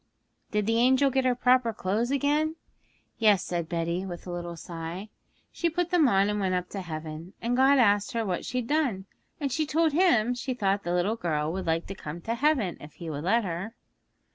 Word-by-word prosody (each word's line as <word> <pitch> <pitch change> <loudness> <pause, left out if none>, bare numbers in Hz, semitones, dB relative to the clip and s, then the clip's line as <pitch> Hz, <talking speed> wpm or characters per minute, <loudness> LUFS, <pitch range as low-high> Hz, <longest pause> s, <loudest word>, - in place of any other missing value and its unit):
'Did 210 -1 0
the 225 +1 +2
angel 260 +3 +4
get 265 0 +1
her 250 -1 +3
proper 250 -1 +3
clothes 215 +3 -1
again?' 295 +3 +1 0.6
'Yes,' 210 -4 +4
said 170 -2 -3
Betty, 170 +1 -1
with 175 -3 -7
a 180 - -6
little 175 -1 -5
sigh; 170 +4 -7 0.4
'she 340 - 0
put 350 +1 -2
them 340 -5 +5
on 195 -1 +3
and 210 0 -1
went 190 -2 0
up 180 0 -2
to 195 - -5
heaven. 160 +1 -7
And 235 +1 -1
God 270 +2 +5
asked 205 -4 +3
her 230 -1 -1
what 180 -3 -2
she'd 250 -1 -2
done. 250 -9 0 0.3
And 280 -3 -2
she 310 +3 0
told 315 +2 +2
Him 290 - +3
she 250 +1 -3
thought 200 -3 +1
the 175 -1 -2
little 200 +6 +1
girl 155 -5 -1
would 190 -1 -4
like 165 +1 0
to 195 - -6
come 160 -3 -7
to 230 - -2
heaven, 240 - +1
if 150 0 -11
He 165 -2 -7
would 145 +2 -5
let 225 +5 +3
her.' 190 +5 -4
210 Hz, 215 wpm, -27 LUFS, 175-255 Hz, 0.6 s, them